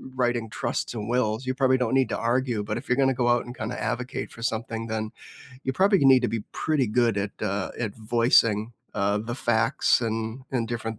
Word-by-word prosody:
writing 120 -3 0
trusts - - -2
and 110 -1 -5
wills, 120 0 0
you 130 - 0
probably 130 -1 +3
don't 125 +1 +1
need 135 -1 +3
to - - -1
argue, 120 -2 0
but 110 +2 -3
if 125 - -8
you're 125 - +2
gonna 135 -1 +3
go 120 -1 +1
out 120 0 +3
and 120 0 -9
kinda 110 +3 -4
advocate 125 +2 -3
for 115 - -12
something, 115 0 -2
then 110 -1 -2 0.5
you 130 - -1
probably 195 +6 +4
need 130 -2 +7
to 120 - +1
be 115 - -2
pretty 150 -5 0
good 115 0 +2
at, 100 0 -2
uh, 100 0 -1
at 110 -5 -3
voicing, 115 -1 +2 0.2
uh, 100 0 +1
the 115 +3 -4
facts 120 -2 +2
and 115 +2 -3
and 120 -4 -1
different 115 -2 -4
120 Hz, 215 wpm, -26 LUFS, 110-125 Hz, 0.5 s, need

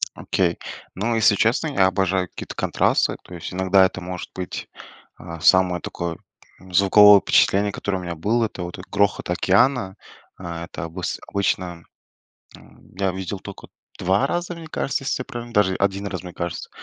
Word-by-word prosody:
Окей, 90 -3 0 0.4
ну, 115 +5 -1
если 110 -2 +4
честно, 120 +10 +1
я 100 -10 +3
обожаю 95 -1 0
какие-то - - -9
контрасты, - - +1
то 90 - -13
есть 85 +1 -7
иногда 95 +1 +4
это 95 - -3
может 90 0 -6
быть 90 -1 -5 0.5
А, 85 -1 -9
самое 90 +1 +4
такое 85 -1 -5 0.4
звуковое 100 +2 +6
впечатление, 100 +4 +3
которое 100 -1 -3
у - - -7
меня 85 -1 -5
было- 110 +8 +1
это 95 - -7
вот 85 +2 -7
грохот 100 -2 0
океана. 95 +3 +2 0.4
А, 85 -2 -6
это 80 0 -7
обыс 85 +2 -4
обычно, 90 -4 -2 0.7
а, - - -16 0.4
я 95 -1 +1
видел 95 +1 -5
тока 100 +1 -10 0.3
2 95 +8 +2
раза, 175 0 -3
мне 165 -1 -9
кажется, 135 -3 -2
если 130 - -1
я - - -6
правильно 120 -2 -8
даже 95 -4 +3
1 100 +1 -1
раз, 95 -3 -5
мне 90 -1 -9
кажется, 85 -1 -5
95 Hz, 170 wpm, -22 LUFS, 90-105 Hz, 0.7 s, звуковое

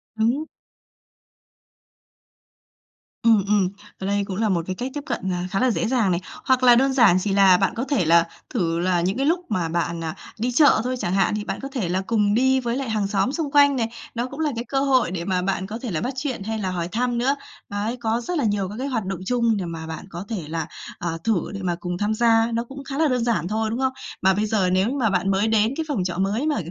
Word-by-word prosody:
Đúng. 240 +8 +1 2.8
Ừm, 225 -4 +5
ừm, 200 -3 +3 0.3
ở 190 - -4
đây 200 0 +1
cũng 190 -2 -5
là 220 -1 +1
một 170 -3 +1
cái 185 - -3
cách 255 +4 -4
tiếp 290 - -4
cận, 190 - -2
à, 180 +1 -3
khá 195 - 0
là 255 -1 +3
dễ 225 - -1
dàng 230 -7 +2
này, 175 - +1 0.3
hoặc 260 -1 +3
là 245 -1 +8
đơn 265 +2 +3
giản 215 -9 +5
chỉ 195 +1 -1
là 195 -2 +6
bạn 195 +3 +1
có 235 - -2
thể 265 - 0
là 170 +1 +5 0.2
thử 170 -8 -1
là 175 -1 +1
những 190 +7 0
cái 275 - 0
lúc 340 +3 +2
mà 180 -5 -1
bạn, 170 0 -2
à, 160 +2 -4 0.2
đi 245 +2 0
chợ 275 -4 +5
thôi 255 +1 -1
chẳng 175 - -1
hạn, 195 +1 +2
thì 210 - -3
bạn - - -4
có 270 - -4
thể 220 -11 -2
là 185 +2 0
cùng 210 -3 +2
đi 260 +3 +3
với 240 -1 -2
lại 270 -4 -3
hàng 210 -2 0
xóm 200 +4 +1
xung 300 -3 -3
quanh 285 -1 +5
này, 230 -3 0 0.3
nó 240 +2 -1
cũng 275 +4 -10
là 305 -2 +1
cái 235 +2 -4
cơ 270 -1 0
hội 260 -9 +2
để 170 -2 -4
mà 185 -2 0
bạn 190 0 -1
có 220 +3 -6
thể 240 -6 -4
là 155 - -1
bắt 255 +2 -2
chuyện 255 -7 -3
hay 220 +1 -3
là 190 -2 -2
hỏi 170 -2 -2
thăm 245 +2 0
nữa. 265 +4 +2 0.3
Đấy, 210 +4 -2
có 230 +1 0
rất 350 +7 -3
là 280 - 0
nhiều 205 -3 0
các 210 - -7
cái 275 - -2
hoạt 225 -7 -2
động 190 -1 -3
chung 235 -2 +2
để 185 - -3
mà 165 -1 -6
bạn 160 +3 -6
có 175 +3 -7
thể 180 -9 -4
là, 160 -1 -3 0.3
à, 175 - -3 0.2
thử 210 -7 +2
để 195 - -5
mà 175 -1 0
cùng 180 0 -4
tham 210 +2 0
gia, 230 0 +3
nó 230 +1 0
cũng 275 +3 -10
khá 275 0 -5
là 320 -1 +3
đơn 250 -3 +1
giản 215 -8 0
thôi, 220 +1 -1
đúng 235 +3 -3
không? 260 0 +1 0.3
Mà 190 +1 +4
bây 210 +3 0
giờ 205 -4 +1
nếu 185 +3 +2
như 275 - -2
mà 225 -5 +2
bạn 190 +1 +1
mới 195 +3 +2
đến 220 +2 +2
cái 320 - 0
phòng 250 -11 -1
trọ 175 -1 -3
mới 205 +10 0
mà 300 - +1
215 Hz, 270 wpm, -23 LUFS, 185-250 Hz, 2.8 s, là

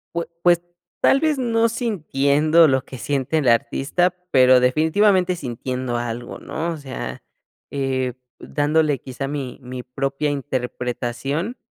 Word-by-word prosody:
Pues 170 0 -2
pues 175 -1 +5 0.4
tal 275 - +5
vez 310 -2 +1
no 230 -2 +2
sintiendo 155 - +3
lo 130 -1 +1
que 130 - -9
siente 140 +4 -1
el 135 -5 +2
artista, 140 +10 +1 0.2
pero 130 -1 +6
definitivamente 180 +7 +3
sintiendo 125 -2 -3
algo, 120 0 -5
¿no?, 165 +2 -4
o 165 - -4
sea, 135 -3 -6 0.5
eh, 130 -2 -1 0.3
dándole 150 -2 +1
quizá 130 +2 -5
mi-mi 130 -3 -6
propia 135 +3 -2
interpretación, 135 - -3
140 Hz, 125 wpm, -22 LUFS, 130-170 Hz, 0.5 s, pero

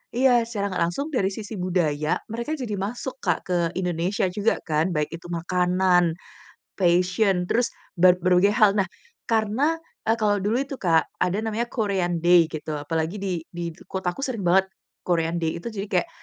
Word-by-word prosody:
iya, 250 -1 +4
secara 200 -3 -2
nggak 175 - -1
langsung 280 - -3
dari 195 -6 +2
sisi 215 +1 -7
budaya, 160 -5 0
mereka 235 +7 -3
jadi 240 -6 -4
masuk 245 +6 -4
Kak 175 -4 +1
ke 180 -1 +1 0.2
Indonesia 180 +2 0
juga 205 +4 +1
kan, 155 +3 +1
baik 150 -1 0
itu 170 +1 -11
makanan, 180 0 +2 0.6
fashion, 180 +1 +2
terus 240 +1 +2 0.3
ber 180 0 +7
berbagai 185 +3 +4
hal. 215 -4 +6
Nah, 190 - +2 0.4
karena, 225 +8 +2 0.3
eee, 225 - +5
kalau 205 -1 +2
dulu 230 +6 +1
itu 275 -1 -6
Kak 165 -3 +2
ada 180 +3 +1
namanya 225 +2 -1
Korean 190 -6 0
day 175 -1 +6
gitu, 155 0 -4
apalagi 160 +5 -2
di 180 -4 -2
di 170 -1 -5 0.2
kotaku 190 +4 -3
sering 230 -7 -3
banget 190 +2 +4 0.4
Korean 170 -1 +1
day 160 -1 -1
itu, 175 - -6
jadi 200 -1 -4
kayak, - - 0
185 Hz, 170 wpm, -24 LUFS, 175-215 Hz, 0.6 s, ber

